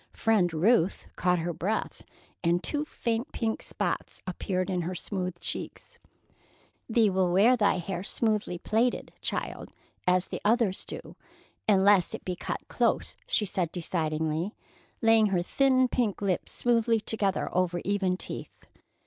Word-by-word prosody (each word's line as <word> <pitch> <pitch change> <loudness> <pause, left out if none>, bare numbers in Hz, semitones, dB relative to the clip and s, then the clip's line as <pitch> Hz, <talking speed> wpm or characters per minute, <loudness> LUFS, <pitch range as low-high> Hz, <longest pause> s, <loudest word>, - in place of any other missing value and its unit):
Friend 210 -6 +2
Ruth 185 +3 +2
caught 180 0 +2
her 170 +1 -2
breath, 195 +7 -2 0.4
and 175 +1 +2
two 295 0 -2
faint 235 -2 -2
pink 225 -2 -1
spots - - -3
appeared 185 0 -2
in 185 -2 -1
her 180 +2 -3
smooth 180 -1 -3
cheeks. - - -3 0.9
"Thee 225 -1 +4
will 185 -1 +2
wear 210 +8 +5
thy 210 -4 +3
hair 180 0 -4
smoothly 210 -4 0
plaited, 225 +7 0
child, - - -3 0.4
as 180 0 +3
the - - -5
others 215 -3 +2
do, - - -8 0.5
unless 195 -2 +5
it - - -10
be 180 - -2
cut - - -5
close," - - 0
she 210 - +1
said 180 -4 -1
decidedly, 160 +1 -1 0.5
laying 225 -1 +6
her 180 -3 +1
thin 260 +4 +3
pink 235 -5 0
lips 195 -3 -1
smoothly 230 -1 +2
together 205 -3 -1
over 180 -1 +1
even 195 -2 +1
teeth. - - -8
195 Hz, 140 wpm, -28 LUFS, 180-225 Hz, 0.9 s, laying